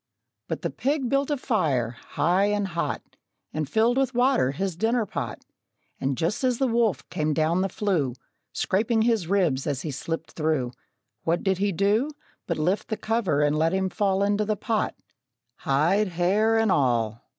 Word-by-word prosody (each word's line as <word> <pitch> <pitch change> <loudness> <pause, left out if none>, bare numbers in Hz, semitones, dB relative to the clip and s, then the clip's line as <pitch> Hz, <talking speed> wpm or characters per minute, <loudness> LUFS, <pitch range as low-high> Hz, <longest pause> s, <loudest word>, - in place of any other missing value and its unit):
But - - -4
the - - -1
pig 275 -2 -1
built 275 +2 +1
a 295 - 0
fire, 155 - 0
high 180 +6 +2
and 205 -1 0
hot, 170 -1 -2 0.5
And 155 -2 -2
filled 230 +6 +3
with 265 -2 0
water 250 - +3
his 180 +6 -2
dinner 225 +5 +1
pot, - - -5 0.5
And 135 -1 -1
just 175 +10 -1
as 250 -2 +2
the 270 - +1
wolf 230 - +1
came 155 -3 0
down 165 +3 +2
the 195 - 0
flue, 170 - 0 0.4
Scraping 220 +3 +1
his 225 -7 +1
ribs 170 -9 +1
as 140 -3 -2
he 155 - -3
slipped 165 +4 -4
through, 155 -6 0 0.5
What 165 +1 0
did 190 -2 +1
he 200 0 +1
do 205 - +2 0.4
But 170 - -1
lift 185 +7 0
the 220 - -3
cover, 195 -10 +1
and 145 0 +2
let 160 +2 +2
him 190 0 +1
fall 195 -1 +1
Into 205 +1 +2
the 210 0 -1
pot 225 +1 -1 0.6
hide, 170 +10 +2
hair 195 +6 +2
and 225 -2 +3
all! 115 -6 +1
190 Hz, 175 wpm, -25 LUFS, 155-220 Hz, 0.6 s, filled